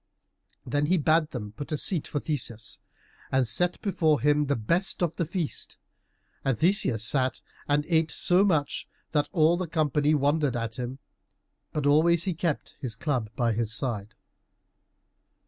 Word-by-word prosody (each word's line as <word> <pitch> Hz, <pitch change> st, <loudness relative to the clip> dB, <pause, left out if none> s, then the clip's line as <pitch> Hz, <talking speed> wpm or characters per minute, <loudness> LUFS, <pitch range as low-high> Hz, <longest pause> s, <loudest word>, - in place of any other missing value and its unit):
Then 145 Hz, +4 st, 0 dB
he 185 Hz, +3 st, +3 dB
bade 155 Hz, 0 st, +2 dB
them 105 Hz, -5 st, -6 dB
put 145 Hz, +8 st, -8 dB
a 155 Hz, -, 0 dB
seat 170 Hz, +1 st, +1 dB
for 145 Hz, -, -2 dB
Theseus, 120 Hz, -7 st, -3 dB, 0.5 s
and 130 Hz, -2 st, +2 dB
set 175 Hz, +9 st, +1 dB
before 160 Hz, -7 st, +2 dB
him 150 Hz, +2 st, +2 dB
the 140 Hz, -, +1 dB
best 170 Hz, -, 0 dB
of 170 Hz, -2 st, -1 dB
the 170 Hz, -, -1 dB
feast, 170 Hz, -3 st, -4 dB, 0.7 s
and 135 Hz, -4 st, 0 dB
Theseus 160 Hz, -, +3 dB
sat 130 Hz, +2 st, +1 dB, 0.3 s
and 145 Hz, 0 st, +1 dB
ate 160 Hz, -2 st, +2 dB
so 180 Hz, +4 st, +3 dB
much 160 Hz, -8 st, 0 dB, 0.2 s
that 150 Hz, -2 st, +1 dB
all 165 Hz, -2 st, +3 dB
the 185 Hz, -1 st, -3 dB
company 150 Hz, -1 st, +1 dB
wondered 145 Hz, -1 st, +1 dB
at 115 Hz, -1 st, -3 dB
him, 125 Hz, +2 st, -4 dB, 0.7 s
but 150 Hz, -2 st, -2 dB
always 160 Hz, +4 st, +4 dB
he 185 Hz, -, -1 dB
kept 165 Hz, -2 st, -3 dB
his 120 Hz, -5 st, -4 dB
club 125 Hz, -4 st, -2 dB
by 120 Hz, -2 st, +1 dB
his 115 Hz, 0 st, -1 dB
side. 110 Hz, -4 st, -3 dB
150 Hz, 160 wpm, -27 LUFS, 125-165 Hz, 0.7 s, always